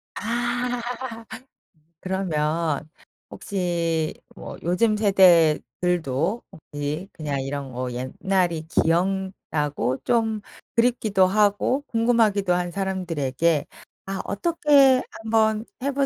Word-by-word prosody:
아. 240 +2 -1 1.2
그러면 160 -5 -1 0.4
혹시 170 -4 -2 0.2
뭐 - - -9
요즘 210 +6 +2
세대들도 180 - +3
혹시 150 +5 -5
그냥 145 -3 -3
이런 135 0 -5
뭐 125 +1 -4
옛날이 160 +6 -1
기억나고 165 -6 0
좀 225 -2 +1 0.3
그립기도 230 -5 +3
하고 205 +7 +2
궁금하기도 225 -5 +2
한 175 0 -1
사람들에게 170 -6 -1 0.4
아 195 0 -3
어떻게 280 - +4
한번 220 0 +1 0.2
해 280 - 0
185 Hz, 195 characters per minute, -24 LUFS, 155-220 Hz, 1.2 s, 어떻게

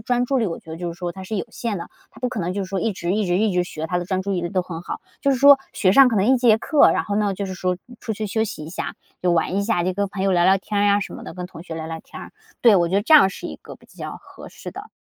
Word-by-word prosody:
专 245 +2 0
注 270 +1 +1
力 225 - +1
我 165 - -4
觉 160 - -14
得 160 - -5
就 175 - -3
是 170 - -9
说 175 -1 -3
它 190 - -9
是 215 +2 -4
有 - - -2
限 225 -2 -3
的， 170 - -6 0.2
他 - - -17
不 250 - 0
可 220 - -3
能 175 +2 -2
就 200 - -1
是 - - -10
说 195 -2 -1
一 225 - 0
直 175 0 -2
一 215 -2 0
直 175 0 +1
一 215 -1 +2
直 180 0 +2
学， 160 -2 -5
他 180 +1 -1
的 175 - -3
专 190 -1 -1
注 200 +1 -2
力 175 -2 -1
都 185 -1 0
很 165 -2 -7
好， - - -6 0.2
就 280 - +2
是 265 - +2
说 280 +1 +8 0.2
学 185 -2 +3
上 270 +1 +8
可 225 - 0
能 195 - +3
一 260 +2 +5
节 235 -3 +5
课， 300 +4 +4
然 - - 0
后 205 - -2
呢 205 -2 +1
就 200 - -4
是 190 - -5
说 180 0 -1 0.2
出 220 - -3
去 215 +1 -3
休 220 +2 0
息 155 -7 -6
一 160 - -9
下， - - -4 0.3
就 180 - +2
玩 170 +3 +1
一 200 - +1
下， 200 -5 0
就 185 - 0
跟 200 +1 -1
朋 190 -1 -5
友 195 0 +2
聊 175 -1 +3
聊 190 +1 +6
天 205 +1 -2
儿 - - +3
呀 200 0 +4
什 - - -5
么 - - -9
的， - - -8
跟 180 - -5
同 165 -2 -11
学 170 -2 -7
聊 160 0 -5
聊 160 0 -6
天 - - -11
儿， - - -11 0.3
对， 230 -4 +7
我 170 -2 +2
觉 185 - -2
得 200 - +3
这 315 - +1
样 285 -10 +8
是 - - -10
一 - - -7
个 - - -12
比 - - -23
较 - - -8
合 - - -13
适 - - -9
的。 410 +2 -9
195 Hz, 380 characters per minute, -22 LUFS, 180-220 Hz, 0.3 s, 说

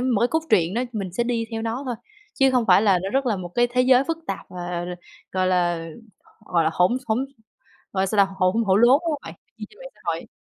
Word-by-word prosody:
một 245 -4 +1
cái 240 - +3
cốt 320 +2 0
truyện 180 -2 +3
đó 245 - 0
mình 195 -5 -4
sẽ 235 +5 -1
đi 235 -1 -1
theo 225 -1 -4
nó 230 +4 -3
thôi, 245 - -2 0.4
chứ 270 0 +4
hông 250 -3 +2
phải 190 +2 +6
là 195 -4 +4
nó 195 - -3
rất 270 +1 0
là 220 - +1
một 180 -2 -6
cái 240 0 +3
thế 245 +1 0
giới 255 +1 +5
phức 330 +1 -3
tạp, - - -5
ờ, 175 -1 -5 0.5
gọi 185 0 +1
là, 175 -2 0 0.6
gọi 170 -2 +1
là, 160 - +2
hỗn 180 +9 +2
hỗn 245 +4 0 0.7
gọi 190 - 0
là 195 - +1
sao 205 +2 -2
ta, 195 - -12
hổ 185 -1 +3 0.2
hổ 190 0 +4
lốn, 240 +3 +6 0.2
đúng 330 - 0
hông 290 -2 -3
bạn? - - -9 0.2
Chi - - -6
trên 425 - -20
mạng - - -9
xã - - -25
hội. - - -2
220 Hz, 265 wpm, -23 LUFS, 185-250 Hz, 0.7 s, phải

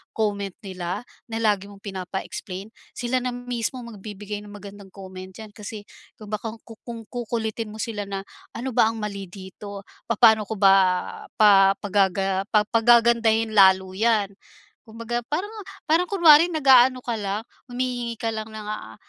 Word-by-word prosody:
comment 200 -2 -1
nila 185 +2 -5 0.2
na 225 -1 -4
lagi 205 -2 +1
mong 200 -1 -15
pinapa-explain, 190 +1 -6 0.2
sila 245 +1 -1
na 250 0 -3
mismo 245 0 -4
magbibigay 210 -2 -7
ng 205 0 -12
magandang 200 -1 -11
comment 185 -1 -10
d'yan, 215 0 -10
kasi 210 0 -8 0.3
kung 215 -1 -12
baka 220 +1 -4
ku 225 -2 -13
kung 230 -1 -6
kukulitin 230 -2 -3
mo - - -10
sila 210 -2 -4
na 195 -1 -4 0.3
ano 255 +3 -4
ba 220 - +4
ang 225 - -2
mali 200 -3 -5
dito, 195 +2 -10 0.2
papaano 220 -2 +4
ko 220 - -4
ba 195 -1 +5 0.6
pa 195 -2 +6
pagaga 195 -1 0 0.2
pagagandahin 230 -1 +4
lalo 190 -2 +5
'yan? 210 0 +1 0.6
Kung 220 - -14
baga 240 +1 -2
parang 370 +8 -2 0.3
parang 335 +3 +2
kunwari 335 -4 +6
nag-aano 260 -6 +5
ka 235 -2 -2
lang, 205 +1 -3 0.2
humihingi 245 -2 -3
ka 225 -2 -1
lang 220 0 -5
ng, 220 -1 -8
ah, 215 - -6
215 Hz, 155 wpm, -24 LUFS, 200-235 Hz, 0.6 s, pa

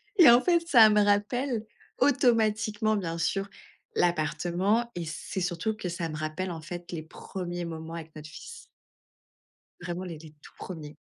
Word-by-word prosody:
Et 345 - +9
en 240 +1 +7
fait 345 +3 +3
ça 235 -9 +8
me 210 0 +4
rappelle, 215 +4 +1 0.3
automatiquement 220 -5 +2
bien 170 -5 -3
sûr, 195 +4 -1 0.5
l'appartement, 175 +7 +1
et 175 -1 -3
c'est 160 +4 -5
surtout 175 +5 -1
que 190 -4 -5
ça 170 -1 -3
me 155 - -5
rappelle 155 +4 -3
en 165 -2 -6
fait, 175 +2 -8
les 165 -3 -4
premiers 175 +1 -6
moments 165 0 -6
avec 160 -1 -9
notre 155 0 -9
fils. 470 - -10 1.2
Vraiment, 175 +1 -4
les 170 -3 -6
les 155 0 -12
tout - - -15
premiers. 155 -5 -8
180 Hz, 160 wpm, -28 LUFS, 165-215 Hz, 1.2 s, Et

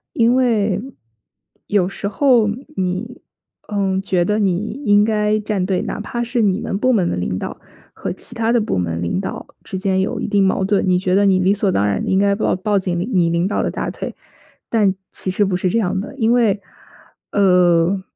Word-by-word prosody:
因 235 +1 +4
为， 220 -6 +1 0.9
有 190 -3 +1
时 200 - -5
候 240 0 +3 0.3
你 190 +7 -3 0.5
嗯， 195 -2 0
觉 185 -2 +1
得 210 +4 0
你 210 +6 -1
应 205 -1 +5
该 210 -1 +1
站 205 -3 -1
队， 185 -1 0
哪 - - -4
怕 240 +3 -3
是 240 0 -1
你 200 0 +1
们 230 -4 -2
部 255 +5 +2
门 195 -6 +2
的 - - -2
领 90 +1 -2
导 - - -6 0.3
和 - - -5
其 195 - -9
他 230 0 0
的 240 - +3
部 210 - -1
门 85 -2 -2
领 85 - -1
导 195 - -5 0.2
之 190 - -6
间 190 0 0
有 190 - -1
一 - - -2
定 205 - +2
矛 190 0 +2
盾， 195 0 +1
你 180 -1 +3
觉 185 0 -1
得 200 +1 +4
你 190 -2 +4
理 185 +2 +3
所 205 -1 0
当 100 - +1
然 100 -1 0
地 - - -3
应 190 - +2
该 200 0 +3
抱 205 - 0
抱 200 +2 0
紧 180 -2 -2
领 180 +7 -2
你 175 -3 +3
领 170 +1 +1
导 200 - 0
的 - - -1
大 - - -3
腿， - - -6 0.5
但 205 -4 +2 0.2
其 - - -4
实 195 +3 +1
不 190 -2 0
是 185 0 0
这 230 - +1
样 190 -2 0
的。 265 +8 -7
因 230 -4 +1
为， 225 -5 +2 0.7
呃， 180 -1 +3
200 Hz, 235 characters per minute, -19 LUFS, 185-215 Hz, 0.9 s, 应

